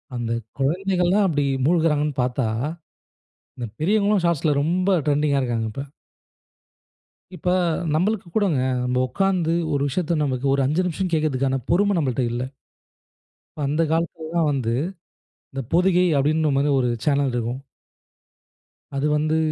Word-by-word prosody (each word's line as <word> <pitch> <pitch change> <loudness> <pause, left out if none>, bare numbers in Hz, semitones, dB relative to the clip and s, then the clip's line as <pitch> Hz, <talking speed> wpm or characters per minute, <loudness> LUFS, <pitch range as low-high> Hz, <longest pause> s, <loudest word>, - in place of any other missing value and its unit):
அந்த 120 -1 -3 0.3
குழந்தைகளலாம் 180 +6 +2
அப்படி 145 -5 0 0.2
மூழ்கிறாங்கன்னு 150 -3 +2
பார்த்தா. 125 -1 -1 1.1
இந்த 120 - -4
பெரியவர்களும் 200 +3 +2
Shortsல 155 -3 +1
ரொம்ப 180 +4 +2
ட்ரெண்டிங்கா 145 -1 +2
இருக்காங்க. 115 -3 -1
இப்ப. 135 +5 -5 1.5
இப்ப 180 +1 -2 0.5
நம்பளுக்கு 190 +4 0
கூடங்க. 195 -10 +2 0.2
நம்ம 125 0 0
உட்கார்ந்து 180 +1 0 0.2
ஒரு 140 - 0
விஷயத்த 170 +3 -1
நமக்கு 130 -2 -2
ஒரு 140 - +2
5 155 +7 +1
நிமிஷம் 180 +1 -2
கேட்கறதுக்கான 135 -4 +1
பொறுமை 200 +4 +3
நம்பள்ட்ட 135 -5 0
இல்ல. 120 +1 -2 1.1
இப்ப 145 -2 -1
அந்த 155 +3 +1
காலத்திலலா 165 0 -1
வந்து, 125 -5 -1 0.8
இந்த 135 -1 -4
பொதிகை 180 +1 +4
அப்படின்ற 155 +3 +2
மாரி 140 +2 +2
ஒரு 125 -2 +2 0.2
சேனல் 140 -2 +2
இருக்கும். 120 +2 -2 1.3
அது 140 +1 0
வந்து 155 +1 +1
150 Hz, 125 wpm, -23 LUFS, 135-175 Hz, 1.5 s, பொதிகை